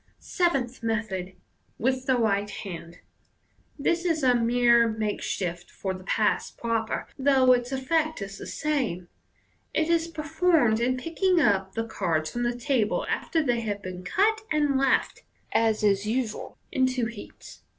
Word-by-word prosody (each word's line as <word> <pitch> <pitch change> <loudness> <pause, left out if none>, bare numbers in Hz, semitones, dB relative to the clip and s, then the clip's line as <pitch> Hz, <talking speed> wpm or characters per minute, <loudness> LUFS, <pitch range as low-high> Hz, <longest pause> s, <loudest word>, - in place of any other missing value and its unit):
Seventh 270 -10 -1
Method. 210 -5 -2 0.4
(With 260 +2 -1
the 260 -2 +3
right 205 -3 +1
hand.) 175 -4 -8 0.4
— - - -39
This 340 0 +2
is 325 -4 0
a 255 -1 +5
mere 235 0 +4
makeshift 205 -5 -3
for 190 -1 -4
the 185 0 -9
pass 210 +2 +1
proper, 230 -1 -2
though 265 -2 +4
its 245 0 +2
effect 310 +4 0
is 195 -1 -7
the - - -7
same. 250 - -2 0.7
It 315 +1 +1
is 335 -1 +2
performed 315 -7 +2
in 255 +2 +1
picking 345 +5 +1
up 195 -8 +2
the 225 0 -1
cards 165 -8 -1
from 240 - -3
the 240 0 -1
table 245 -4 0
after 320 -2 0
they 245 -4 +1
have 205 -3 -4
been 185 0 -7
cut, 420 - +2
and 295 -2 +2
left, 270 0 +1 0.3
as 220 -1 +2
is 200 0 +2
usual, 230 -1 -3
in 260 -1 +2
two 255 -2 -1
heaps. 225 -2 -10
240 Hz, 155 wpm, -26 LUFS, 205-275 Hz, 0.7 s, a